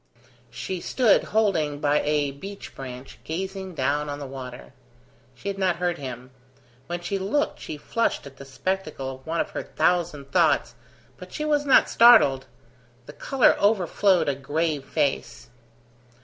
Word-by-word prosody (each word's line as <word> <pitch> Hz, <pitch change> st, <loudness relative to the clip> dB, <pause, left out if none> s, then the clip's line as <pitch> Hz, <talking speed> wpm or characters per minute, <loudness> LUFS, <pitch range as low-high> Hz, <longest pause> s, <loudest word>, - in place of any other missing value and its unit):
She 185 Hz, -2 st, -5 dB
stood 245 Hz, -6 st, +3 dB
holding 170 Hz, -10 st, +1 dB
by 150 Hz, 0 st, +2 dB
a 145 Hz, -1 st, +1 dB
beech 195 Hz, +9 st, -9 dB
branch, 130 Hz, -1 st, -9 dB
gazing 190 Hz, +2 st, -5 dB
down 145 Hz, +2 st, 0 dB
on 145 Hz, -, -4 dB
the 145 Hz, -, -7 dB
water. 130 Hz, -2 st, -9 dB, 0.6 s
She 125 Hz, -, -10 dB
had 195 Hz, 0 st, -3 dB
not 185 Hz, -2 st, +2 dB
heard 175 Hz, -1 st, -2 dB
him. 130 Hz, -2 st, -7 dB, 0.6 s
When 175 Hz, +2 st, -4 dB
she 195 Hz, +3 st, -2 dB
looked 220 Hz, +11 st, -1 dB
she 155 Hz, -, -7 dB
flushed 230 Hz, +9 st, -1 dB
at 140 Hz, -1 st, -12 dB
the -, -, -10 dB
spectacle 150 Hz, -2 st, -3 dB
of 130 Hz, -, -24 dB
one 165 Hz, +1 st, -1 dB
of -, -, -5 dB
her -, -, -4 dB
thousand 165 Hz, -6 st, -1 dB
thoughts, -, -, +2 dB, 0.4 s
but -, -, -11 dB
she 305 Hz, -, -4 dB
was 295 Hz, -1 st, +1 dB
not 270 Hz, -, +6 dB
startled; 220 Hz, -, +6 dB, 0.6 s
the 145 Hz, -, -11 dB
colour 270 Hz, -, +3 dB
overflowed 195 Hz, -2 st, +2 dB
a 140 Hz, -, +2 dB
grave 145 Hz, +1 st, -2 dB
face. 140 Hz, -5 st, -2 dB
160 Hz, 155 wpm, -25 LUFS, 140-195 Hz, 0.6 s, not